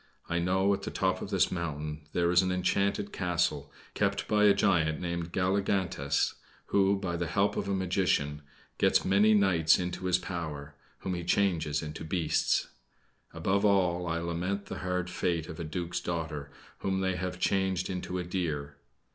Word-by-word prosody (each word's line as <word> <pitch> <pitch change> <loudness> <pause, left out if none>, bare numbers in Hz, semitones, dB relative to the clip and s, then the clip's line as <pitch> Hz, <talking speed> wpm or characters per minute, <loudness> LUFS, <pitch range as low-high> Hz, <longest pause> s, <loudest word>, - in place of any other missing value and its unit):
I 85 - 0
know, 95 +3 +2
at 100 - -2
the - - -4
top - - 0
of - - -5
this - - +2
mountain 75 -3 -4
there 85 0 +1
is 90 - +6
an 95 -1 0
enchanted 100 +2 0
castle, 85 -5 -1 0.2
kept - - 0
by 105 0 +3
a 100 - +7
giant 80 -5 +2
named 85 -1 -3
Galligantes, 95 -6 0 0.4
who, 100 0 +3
by 95 -3 -3
the 85 0 -2
help 100 +4 +1
of 100 - -2
a 100 - +1
magician, 90 -6 0 0.4
gets - - +3
many 105 +3 +5
knights 90 -6 +4
into 90 +1 -4
his 90 -1 +3
power 80 -6 -5 0.3
whom 95 - -2
he 85 -1 -3
changes 85 -6 +1
into 75 +1 -6
beasts. 80 -1 +1 0.6
Above 95 +5 0
all, 90 -4 +2
I 80 0 0
lament 85 +4 -2
the - - -6
hard 90 -1 -2
fate 85 -3 -1
of 80 - -8
a - - -3
duke's 85 +2 -3
daughter, 80 -4 -4 0.3
whom 95 0 -1
they 95 -1 0
have 90 +1 -3
changed 95 0 +1
into 90 -1 -4
a 90 - -2
deer. 75 -6 -3
90 Hz, 170 wpm, -30 LUFS, 80-95 Hz, 0.6 s, a